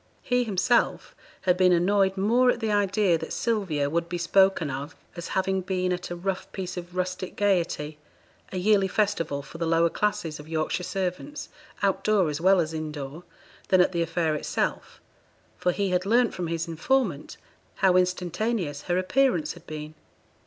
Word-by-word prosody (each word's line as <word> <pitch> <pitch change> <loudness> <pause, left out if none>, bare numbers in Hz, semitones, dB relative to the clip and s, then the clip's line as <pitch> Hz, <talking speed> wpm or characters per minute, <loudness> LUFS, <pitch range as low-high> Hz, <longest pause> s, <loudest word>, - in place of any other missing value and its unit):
He 245 -1 +2
himself 225 +2 +1 0.3
had 180 -2 +3
been 185 -1 +5
annoyed 190 +2 +3
more 235 +6 +3
at 240 - +1
the 220 -2 -1
idea 200 -3 +2
that 160 - -7
Sylvia 190 -11 0
would 170 +3 -1
be 175 - -2
spoken 180 -2 +3
of 140 +6 -6 0.2
as 170 -2 -6
having 190 0 +1
been 185 -1 -1
at 180 0 -5
a 175 - -4
rough 185 +2 -4
piece 185 -2 -5
of 180 0 -8
rustic 185 0 -3
gaiety 170 -6 0 0.5
a 185 - -4
yearly 195 +1 +3
festival 175 -9 -1
for 155 +4 -11
the 165 - -1
lower 165 0 +3
classes 170 -7 -1
of 150 +1 -11
Yorkshire 160 +3 -1
servants, 190 +11 -4 0.3
out 195 -1 +1
door 200 -7 +3
as 150 +2 -4
well 190 +1 +5
as 160 -1 -1
in 155 -1 -4
door 150 +3 -7 0.4
than 185 - +4
at 180 - +4
the 170 -2 -1
affair 165 -1 0
itself, 150 - -2 0.6
for 180 - +2
he 200 +2 -1
had 180 0 +1
learnt 240 +2 +3
from 175 -2 -3
his 165 +1 -2
informant 255 +11 -1 0.4
how 190 -2 +3
instantaneous 180 -2 0
her 175 - +2
appearance 270 - +1
had 175 -1 -16
been. 155 0 -7
180 Hz, 175 wpm, -26 LUFS, 165-195 Hz, 0.6 s, been